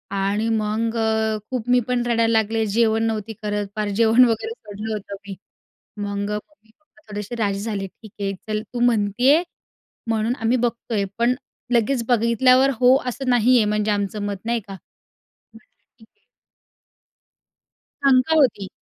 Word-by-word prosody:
आणि 200 +3 0
मग 220 +1 -1
अ, 220 -1 +1
खूप 250 -2 -3
मी 250 0 +5
पण 250 -1 0
रडायला 230 -1 +2
लागले. 220 0 +1
जेवण 220 +1 +2
नव्हती 225 -1 -2
करत. 205 -1 -2
पार 210 -1 -2
जेवण 230 +2 +6
वगैरे 240 - -1
सोडलं 215 - -7
होतं 200 -1 -6
मी. 195 - -6 0.6
मग 205 0 -3
मम्मी-पप्पा 225 +5 -10
थोडेसे 210 +3 -5
राजी 200 -4 -1
झाले. 200 -2 -3
ठीक 215 +2 -16
आहे. 195 0 -1
चल, 215 0 -1
तू 245 - -3
म्हणत 220 -4 +2
आहे, 290 +7 +5 0.6
म्हणून 225 +1 0
आम्ही 230 +3 +2
बघतो 235 -1 -2
आहे, 200 -2 +1
पण 240 +2 +2 0.4
लगेच 235 +2 +2
बघितल्यावर 255 +3 +4
हो 255 +1 +6
असं 255 +1 -3
नाहीये 245 -1 +4
म्हणजे 210 0 0
आमचं 205 0 -2
मत. 200 -1 -3
नाही 235 0 0
का? 195 - -8 0.6
म्हटलं 225 0 -22 0.2
ठीक 220 - -19
आहे. 430 - -42 1.8
शंका 270 +3 +4
होती. 250 -10 +2
225 Hz, 155 wpm, -22 LUFS, 210-245 Hz, 1.8 s, जेवण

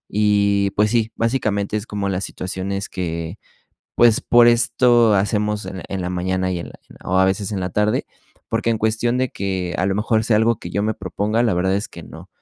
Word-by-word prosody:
y, 100 -1 +2
pues 105 +2 +1
sí, 115 -2 +1
básicamente 110 -4 -1
es 105 +2 -6
como 100 -1 -3
las 95 0 -2
situaciones 95 +2 -4
que, 85 0 -4 0.6
pues, 120 -2 +5
por 120 0 +5
esto 120 -1 +4
hacemos 105 +1 0
en 95 -2 -6
en 95 -1 -3
la 90 - -3
mañana 95 +1 -1
y 90 - -2
en - - -7
la - - -13
en - - -16
la - - -10
o 95 - +2
a 95 - +5
veces 95 +2 -1
en 100 - -2
la 90 0 -3
tarde, 105 +3 0 0.4
porque 115 - 0
en 115 - 0
cuestión 110 +3 0
de 130 0 +1
que 95 -2 -3
a 95 - +1
lo 95 - 0
mejor 110 +1 +1
sea 110 -2 +3
algo 110 +1 +2
que 85 - -8
yo 100 - -1
me 110 +1 0
proponga, 100 +4 -1
la 110 -6 +2
verdad 95 +2 +1
es 100 - -3
que - - -11
no, - - -12
100 Hz, 225 wpm, -20 LUFS, 95-110 Hz, 0.6 s, pues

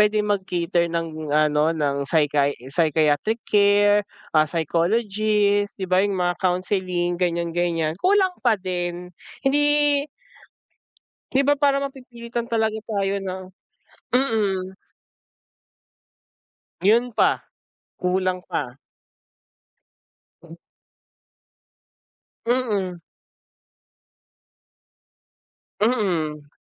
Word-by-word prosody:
pwedeng 210 0 +2
mag-cater 175 -3 0
ng, 160 -2 -4
ano, 155 +1 +3
ng 140 -2 -1
psychi 145 -2 +2 0.2
psychiatric 160 +7 +1
care, 205 0 +4 0.3
ah, 155 -1 +4
psychologist, 205 +5 +1
di 190 - -4
ba, 185 - +4
'yung 200 0 0
mga 175 -1 0
counseling, 180 -1 -1
ganyan-ganyan, 170 -1 -1
kulang 380 -1 +3
pa - - +3
din. 180 -1 -4 0.3
Hindi 290 +1 +3 1.3
di 270 - +3
ba 290 - +5
parang 280 -1 +2
mapipilitan 240 -3 -7
talaga 220 -1 0
tayo 200 -2 0
na 185 -1 -4 0.8
mm. 205 -7 0 2.1
Yun 235 +4 +3
pa, - - +2 0.5
kulang 185 0 0
pa. - - -4 1.6
Tapos - - -13 1.9
Mm. 205 -8 -1 2.8
Mm. 170 - 0
190 Hz, 80 wpm, -23 LUFS, 170-220 Hz, 2.8 s, ba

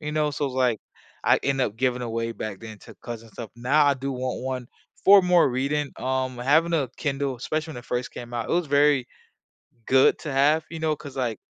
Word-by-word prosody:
you 150 0 -4
know, 150 -1 +1
so, 145 0 -2
it - - -1
was 130 - -8
like, 125 -4 +1 0.4
I - - +5
end 135 -1 0
up 110 -4 -1
giving 125 0 0
away 115 -1 -3
back 110 -3 -6
then 110 -2 -9
to - - -13
cousins 115 -2 -8
and - - -30
stuff. 115 -4 -7
Now 135 +6 +3
I 140 - +5
do 135 +1 -4
want 130 0 -3
1 130 -1 -4 0.4
for 200 0 +9
more 180 -4 +4
reading. 140 +3 -1
Um, 130 -1 -2
having 155 +7 +3
a 145 -6 +1
Kindle, 140 -3 -2
especially 155 +6 -3
when - - -10
it 120 - -11
first 125 0 -3
came 120 0 -9
out, 115 -2 -3
it - - -1
was 175 -1 +1
very 145 -2 +3 0.8
good 130 0 +5
to 150 -3 -5
have, 150 +4 +3
you 165 - -6
know, 160 -1 0
'cause, 145 -2 -11
like, 120 -5 -2
130 Hz, 235 wpm, -25 LUFS, 120-150 Hz, 0.8 s, for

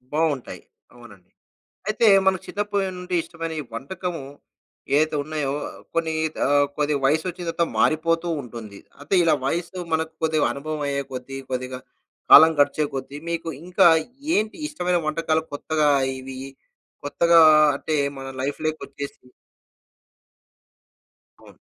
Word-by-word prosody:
బాగుంటాయి. 155 -5 -1 0.3
అవునండి. 100 -7 -16 0.6
అయితే 220 +2 +2 0.2
మనకు 190 -1 +2
చిన్నప్పటి 200 -2 -2
నుండి 180 0 -4
ఇష్టమైన 165 -1 -6 0.2
వంటకము 165 +5 -5 0.7
ఏదైతే 155 +2 +3
ఉన్నాయో 150 -2 -3 0.4
కొన్ని 165 -1 0 0.3
ఆహ్, 145 +1 +4
కొద్దిగా 150 -1 +1
వయసు 155 +5 +2
వచ్చిన 180 0 -5
తర్వాత 170 0 0
మారిపోతూ 165 +2 +2
ఉంటుంది. 115 -5 -9 0.2
అంటే, 145 +6 -5
ఇలా 165 -2 +4
వయస్సు 170 +5 -2
మనకు 160 0 -1
కొద్దిగా 155 -2 +2
అనుభవం 155 +2 -5
అయ్యే 140 0 -1
కొద్దీ, 130 +1 -6
కొద్దిగా 130 0 -3 0.5
కాలం 160 +1 +10
గడిచే 150 +1 +3
కొద్దీ, 135 +1 -6
మీకు 165 -1 -3 0.2
ఇంకా 180 -1 +5 0.5
ఏంటి 215 +1 0
ఇష్టమైన 180 - 0
వంటకాలు. 160 0 0
కొత్తగా 155 +1 0 0.3
ఇవి 130 0 -8 0.7
కొత్తగా 170 +3 +4 0.4
అంటే, 155 +2 -2 0.2
మన 135 0 -7
లైఫ్‌లోకొచ్చేసి 145 -1 -5 2.2
అవును. - - -17
155 Hz, 115 wpm, -23 LUFS, 140-170 Hz, 2.2 s, కాలం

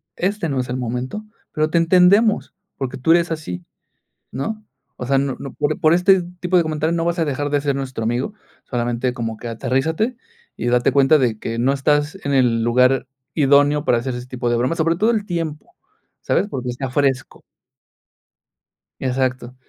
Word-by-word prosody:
este 195 -1 -1
no 135 -2 -1
es 125 - -7
el 125 - -2
momento, 125 - -4 0.3
pero 155 0 0
te 170 - +1
entendemos, 185 +6 +4 0.2
porque 130 -2 -4
tú 150 +6 +1
eres 170 0 +3
así, 90 - -5 0.7
¿no? 215 - -4 0.3
O 125 - -6
sea, 135 0 +2
no 135 -1 -1
no 135 - -7
por 150 +1 -1
por 155 +1 +4
este 180 +1 +4 0.2
tipo 180 0 +1
de 175 - +5
comentario 155 +1 -1
no 165 - 0
vas 170 +1 -1
a 165 - +2
dejar 145 0 -2
de 145 0 +1
ser 140 -1 0
nuestro 130 -4 -4
amigo, 120 - -1 0.3
solamente 120 0 -1
como 115 -2 -4
que 120 - -7
aterrízate 135 - -1 0.4
y - - -4
date 125 +1 +2
cuenta 140 +2 +5
de 120 -5 0
que 115 +1 -4
no 130 +3 +2
estás 145 +4 +1
en 140 -1 0
el 120 -3 +3
lugar 125 +3 +3 0.3
idóneo 145 0 +4
para 120 - +3
hacer 125 +1 -3
este 125 0 -6
tipo 125 -1 -2
de 120 - +2
bromas, 125 +7 0
sobre 165 +1 +2
todo 220 +5 +2
el 215 -3 0
tiempo, 165 -5 -4 0.5
¿sabes? 200 - +1
Porque 125 -2 -4
está 130 +1 -4
fresco. 135 -1 -1 1.6
Exacto. 130 -1 -1
135 Hz, 185 wpm, -20 LUFS, 125-165 Hz, 1.6 s, de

